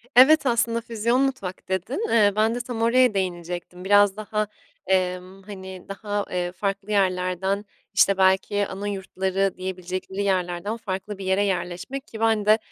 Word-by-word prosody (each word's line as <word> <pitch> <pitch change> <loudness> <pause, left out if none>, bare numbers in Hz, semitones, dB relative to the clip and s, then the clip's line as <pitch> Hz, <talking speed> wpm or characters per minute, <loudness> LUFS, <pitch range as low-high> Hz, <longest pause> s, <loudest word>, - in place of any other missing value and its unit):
Evet, 285 +4 +7
aslında, 235 -1 +1
"füzyon 235 +3 0
mutfak" 200 -10 -3
dedin, 235 - -2
eee, 205 -3 +4
ben 220 +2 +2
de - - -2
tam 240 -2 -5
oraya 245 0 +4
değinecektim. 180 -1 -4
Biraz 205 0 +5
daha, 215 0 -2 0.4
emm, 185 0 -1
hani, 190 -2 -9
daha, 205 0 -3
eee, 175 -1 -1
farklı 195 +2 -3
yerlerden, 190 +1 0 0.3
işte, 195 0 +4
belki 190 +2 +2
ana 200 +2 -5
yurtları 190 -1 -1
diyebilecekleri 185 +1 -4
yerlerden 185 +2 -1
farklı 195 -1 -5
bir 195 - -7
yere 190 +2 +2
yerleşmek 180 +8 -3
ki 220 - -9
ben 220 -2 +2
de, 215 +1 +6
195 Hz, 150 wpm, -24 LUFS, 185-215 Hz, 0.4 s, Evet